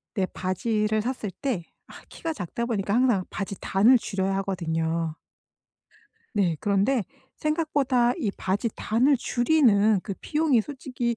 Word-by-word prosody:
내 195 -3 +1
바지를 210 +4 -1
샀을 230 -3 -3
때 245 -11 -1 0.3
아 - - -13
키가 325 -1 -5
작다 220 - -4
보니까 205 -4 -1
항상 235 -6 +3
바지 195 0 -4
단을 220 +7 +4
줄여야 195 -3 -2
하거든요. 165 -4 -2 1.2
네. 190 -6 +1
그런데 205 +5 +1 0.3
생각보다 285 -6 +1
이 230 - -1
바지 200 +4 -1
단을 255 +6 +2
줄이는 240 -6 +3
그 195 - -4
비용이 300 -6 +2
솔직히 255 -2 -3
220 Hz, 275 characters per minute, -26 LUFS, 195-255 Hz, 1.2 s, 단을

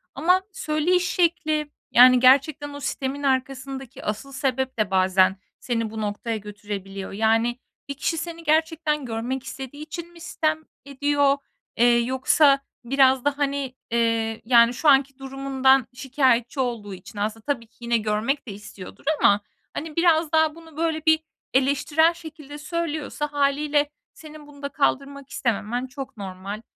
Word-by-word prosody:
Ama 360 +7 +3
söyleyiş 350 +2 0
şekli, 310 -4 0 0.2
yani, 250 +1 +8
gerçekten 280 +3 +4
o 285 - -7
sitemin 275 0 -3
arkasındaki 265 -1 -2
asıl 215 +6 -4
sebep 265 -1 -2
de 210 -3 0
bazen 185 0 +3 0.2
seni 230 -3 -2
bu 220 0 -6
noktaya 215 +2 -3
götürebiliyor. 200 -2 -7
Yani, 225 +4 +1 0.3
bir 280 - -3
kişi 325 +4 -2
seni 335 0 -6
gerçekten 310 -2 +1
görmek 240 +3 -3
istediği 265 +2 -8
için 340 +2 -8
mi 335 - -15
sitem 315 -1 -1 0.2
ediyor? 285 0 +1 0.4
Eee, 240 0 +5
yoksa 265 +3 +3 0.2
biraz 265 +1 +3
da, 290 0 +1
hani, 280 -2 -2 0.2
eee, 230 -1 0
yani, 235 -1 +5
şu 295 +5 +2
anki 275 -1 +4
durumundan 270 -1 +2
şikâyetçi 255 -1 +1
olduğu 230 -6 -2
için 190 +3 -10
aslında 215 +1 -3
tabii 260 -6 -2
ki 225 - -35
yine 235 0 +1
görmek 220 +6 -1
de 210 - -5
istiyordur 200 -2 -11 0.2
ama, 205 +1 +4 0.3
hani, 310 0 -6
biraz 335 -2 +3
daha 315 -1 +3
bunu, 325 -2 -15
böyle, 320 -1 -1
bir 315 0 +5 0.3
eleştirel 290 +5 +3
şekilde 305 -3 -10
söylüyorsa 310 -1 -3
hâliyle 290 +1 +1 0.2
senin 305 -1 -13
bunu 285 -1 -15
da 280 - -3
kaldırmak 280 -1 -1
istememen 240 +2 -2
çok 270 -1 -8
normal. 195 +1 -6
270 Hz, 145 wpm, -24 LUFS, 235-300 Hz, 0.4 s, yani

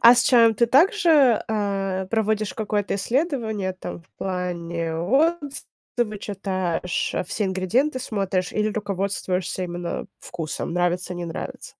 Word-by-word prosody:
А 235 +1 +10
с 245 - +4
чаем 230 -3 +5
ты 235 - +3
также, 300 - +5
а, 195 -3 -1
проводишь 215 -1 0
какое-то 210 -2 -1
исследование 220 - -1
там 185 -2 -8
в - - -31
плане 170 -3 -3
отзывы 265 - -1
читаешь, 185 -3 -2
а, - - 0
все 210 - -2
ингредиенты 200 +10 +1
смотришь 195 -6 -1
или 215 0 +1
руководствуешься 190 -3 -2
именно 175 +1 -4
вкусом, 165 -1 -4
нравится- 180 +1 0
не 175 0 -4
нравится? 165 - -6
200 Hz, 125 wpm, -24 LUFS, 180-230 Hz, -, А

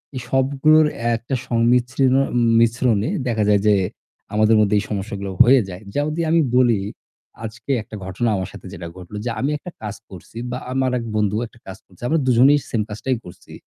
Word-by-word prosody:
এই 130 - -4
সবগুলোর 140 +4 +4 0.3
একটা 120 +4 -4
সংমিশ্রণ 125 +2 +2 0.5
মিশ্রণে 115 -2 +2 0.2
দেখা 110 -3 0
যায় 105 -1 +4
যে 105 - +6 0.6
আমাদের 110 +1 +4
মধ্যে 105 0 +3
এই - - -3
সমস্যাগুলো 100 -1 -4
হয়ে 130 +2 +5
যায়। 90 0 -8
যেমন 145 +1 0
যদি 170 - -1
আমি 165 0 +4 0.2
বলি, 120 -5 +4 0.7
আজকে 115 +5 -6
একটা 110 - -11
ঘটনা 95 +5 -1
আমার 95 -2 -3
সাথে - - -12
যেটা 85 0 -7
ঘটল। 90 +2 -10
যে - - -1
আমি 135 - 0
একটা 180 +5 -10
কাজ 105 -1 -5
করছি 95 +3 -12
বা 125 - -3 0.2
আমার 130 -1 +1
১ 115 - -5
বন্ধু 105 -1 +1
একটা 115 - -22
কাজ 95 +1 -8
করছে। 90 - -23
আমরা 160 +5 +2
দুজনেই 130 +4 +5
সেম 115 - 0
কাজটাই 115 +4 -2
করছি। 90 - -13
115 Hz, 185 wpm, -21 LUFS, 105-130 Hz, 0.7 s, যে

